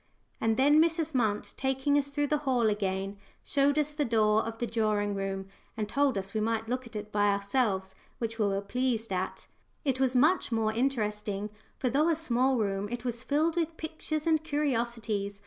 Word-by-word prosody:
And 225 0 +2
then 290 +3 +6
Mrs. 325 -1 +1
Munt, 220 -5 0
taking 265 +2 +1
us 285 -1 +2
through 290 +1 0
the 300 +1 +1
hall 260 -5 +1
again, 195 -1 -2 0.3
showed 280 +1 +2
us 300 0 +1
the 295 0 0
door 220 -3 +3
of 225 0 -5
the 240 - -1
drawing 215 -2 0
room, 195 -1 -3 0.3
and 215 -1 -1
told 275 +1 +1
us 195 0 -4
we 215 - 0
might 225 0 -1
look 250 +1 -2
at 225 - -15
it 210 0 -5
by 205 0 +2
ourselves, 200 -1 0 0.2
which 225 -1 -4
we 210 - +3
were 195 0 0
pleased 225 0 -1
at. 185 0 -3 0.4
It 265 -2 +1
was 260 -1 +2
much 305 +4 +3
more 220 -1 +1
interesting, 210 -5 -1 0.3
for, 255 - -1
though 295 +6 +3
a 330 - +3
small 265 -4 +1
room, 200 -2 -1
it 240 +1 -5
was 235 -1 -2
filled 310 +5 +1
with 330 -1 -1
pictures 310 -1 -3
and 315 -2 +2
curiosities. 235 -9 -1
235 Hz, 195 wpm, -29 LUFS, 210-285 Hz, 0.4 s, then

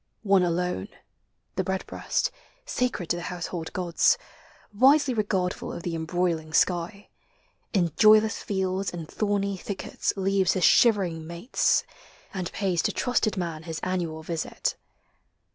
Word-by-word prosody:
One 195 -3 +4
alone. 175 - -1 0.7
The - - +1
redbreast, 190 - -2 0.3
sacred 245 -8 -1
to 175 - +1
the - - -5
household 175 -1 -5
>^m\<. 175 -2 +2 0.6
Wisely 270 +5 +5
regardful 195 -5 -1
of 170 - -7
the 175 - -3
embroiling 165 -1 -1
sky. 180 +4 +1 0.6
In 175 -6 +1
joyless 215 0 +5
fields 190 -1 -1
and 170 -3 -6
thorny 200 -1 -1
thickets 195 +1 -3
leav< 195 -1 +2
His 185 - -1
shivering 185 -9 +4
mates, 170 +8 +1 0.5
and 185 -3 -3
pays 185 -4 0
to - - 0
trusted 240 -4 0
man 170 -4 -3
His 165 -1 -6
annual 170 -4 -2
visit. 165 0 -2
185 Hz, 125 wpm, -26 LUFS, 170-200 Hz, 0.7 s, Wisely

